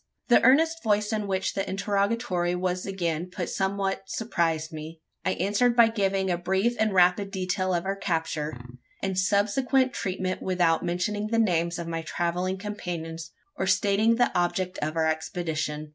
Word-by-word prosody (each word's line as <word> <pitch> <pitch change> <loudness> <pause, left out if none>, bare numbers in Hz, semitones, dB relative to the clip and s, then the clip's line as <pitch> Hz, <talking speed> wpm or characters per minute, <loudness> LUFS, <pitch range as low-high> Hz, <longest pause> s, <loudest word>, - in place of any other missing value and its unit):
The 240 - +6
earnest 320 +6 +4
voice 210 -1 +1
in 210 -2 -1
which 190 -1 -1
the 195 - -2
interrogatory 195 -3 0
was 180 +1 -2
again 175 -3 -2
put 180 -1 -4
somewhat 195 0 -1
surprised 165 -7 -1
me. 160 +1 -8 0.2
I 185 - +1
answered 210 +6 +1
by 235 -2 +6
giving 195 -3 0
a 175 - -1
brief 190 +6 +1
and 220 -1 +2
rapid 185 +1 +3
detail 185 -1 -1
of 170 +1 -2
our 195 +1 -1
capture, 160 -7 -2 0.4
and 190 -1 -1
subsequent 215 +7 +2
treatment 185 -1 -3
without 175 -3 +1
mentioning 205 +5 -1
the 230 +1 0
names 170 -6 +1
of 170 -1 -5
my 165 -1 -3
travelling 175 +3 -2
companions, 170 -5 -5 0.3
or 190 - -2
stating 200 +4 +3
the 245 +1 +2
object 180 +1 0
of 155 +2 -2
our 160 -1 +2
expedition. 155 -2 -2
185 Hz, 160 wpm, -26 LUFS, 170-205 Hz, 0.4 s, The